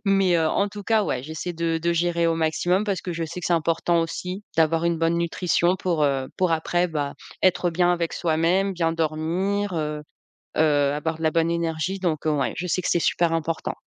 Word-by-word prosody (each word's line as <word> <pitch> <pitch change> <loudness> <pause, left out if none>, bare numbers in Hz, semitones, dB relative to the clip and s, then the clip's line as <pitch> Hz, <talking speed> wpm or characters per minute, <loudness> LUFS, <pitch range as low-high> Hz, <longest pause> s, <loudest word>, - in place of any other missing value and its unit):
mais 195 -2 +3
heu, 165 -1 +2
en 200 +5 +1
tout 205 +1 -8
cas, 220 +1 +2
ouais, 125 -9 -2
j'essaie 160 +5 -5
de 165 -1 -1
de 170 +1 0
gérer 170 0 +1
au 165 - +2
maximum. 165 +4 +1
Parce 200 -4 -1
que 180 - -5
je 165 - -3
sais 170 +3 -6
que 180 - -3
c'est - - +1
important, 165 +1 +1
aussi, 180 +4 -4
d'avoir 165 +1 +3
une 170 -1 +1
bonne 165 +1 +2
nutrition 170 +1 +1
pour, 175 -5 -1
heu, 135 -2 +1
pour 185 -2 +1
après, 175 +2 +1
bah, 145 -3 -3 0.3
être 180 -1 +3
bien 175 +1 +2
avec 170 -1 -1
soi-même, 175 +4 +1
bien 165 -3 0
dormir, 170 +5 -1
heu 150 -1 -2 0.6
heu, 145 -2 +3
avoir 155 +2 -2
de - - -6
la 160 - +4
bonne 165 +1 +1
énergie 170 +2 -2
donc 160 -5 -1
heu, 155 - +3
ouais, 140 -3 0
je 180 - -3
sais 185 - 0
que - - -3
c'est 175 - +2
super 170 0 +1
important. 165 0 -2
165 Hz, 220 wpm, -24 LUFS, 160-180 Hz, 0.6 s, la